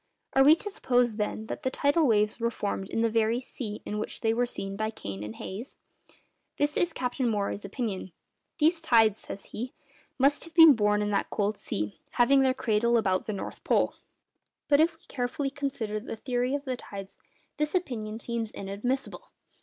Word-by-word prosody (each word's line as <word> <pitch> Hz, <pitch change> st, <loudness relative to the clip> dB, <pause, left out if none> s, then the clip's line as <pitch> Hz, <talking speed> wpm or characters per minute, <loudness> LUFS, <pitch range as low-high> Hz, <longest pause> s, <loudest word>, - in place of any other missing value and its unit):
Are 270 Hz, -, +6 dB
we 300 Hz, +3 st, +8 dB
to 415 Hz, +5 st, -6 dB
suppose, 245 Hz, -, +1 dB
then, 215 Hz, 0 st, -2 dB
that 255 Hz, -, -5 dB
the 260 Hz, -, 0 dB
tidal 285 Hz, +3 st, +2 dB
waves 210 Hz, -1 st, +2 dB
were 235 Hz, 0 st, +1 dB
formed 200 Hz, -3 st, -3 dB
in 225 Hz, -, -1 dB
the 230 Hz, -, +3 dB
very 225 Hz, +1 st, +2 dB
sea 225 Hz, -4 st, -6 dB
in 210 Hz, -, -3 dB
which -, -, -5 dB
they 225 Hz, -1 st, +2 dB
were 245 Hz, +1 st, +1 dB
seen 195 Hz, -4 st, -5 dB
by 215 Hz, +1 st, -1 dB
Kane 100 Hz, -, -6 dB
and 105 Hz, +1 st, -6 dB
Hayes? 215 Hz, +8 st, -7 dB, 0.8 s
This 290 Hz, 0 st, +1 dB
is 350 Hz, -, +2 dB
Captain 250 Hz, -3 st, -1 dB
Maury's 205 Hz, -1 st, -2 dB
opinion:—'These 235 Hz, -, -2 dB
tides,' 225 Hz, -8 st, +4 dB
says 200 Hz, -, -8 dB
he, 245 Hz, +4 st, -6 dB, 0.4 s
'must 275 Hz, +2 st, +3 dB
have 330 Hz, -1 st, -15 dB
been 325 Hz, -3 st, +10 dB
born 210 Hz, -2 st, +2 dB
in 210 Hz, -, -1 dB
that 200 Hz, -, 0 dB
cold 210 Hz, 0 st, 0 dB
sea, 105 Hz, -, -4 dB
having 270 Hz, +3 st, +5 dB
their 260 Hz, -1 st, +3 dB
cradle 235 Hz, -2 st, +2 dB
about 190 Hz, -4 st, +1 dB
the 215 Hz, -, -1 dB
North 195 Hz, -, -6 dB
Pole.' -, -, +2 dB, 0.7 s
But 285 Hz, -1 st, +5 dB
if 325 Hz, +1 st, +4 dB
we -, -, -32 dB
carefully 270 Hz, +2 st, -2 dB
consider 265 Hz, -7 st, -3 dB
the 225 Hz, -, -6 dB
theory 250 Hz, +3 st, -1 dB
of 285 Hz, 0 st, -4 dB
the 255 Hz, -2 st, -2 dB
tides, 195 Hz, -4 st, -9 dB, 0.4 s
this 300 Hz, +3 st, -1 dB
opinion 225 Hz, -11 st, -2 dB
seems 235 Hz, -2 st, -3 dB
inadmissible. 245 Hz, -, -4 dB
235 Hz, 185 wpm, -28 LUFS, 210-270 Hz, 0.8 s, been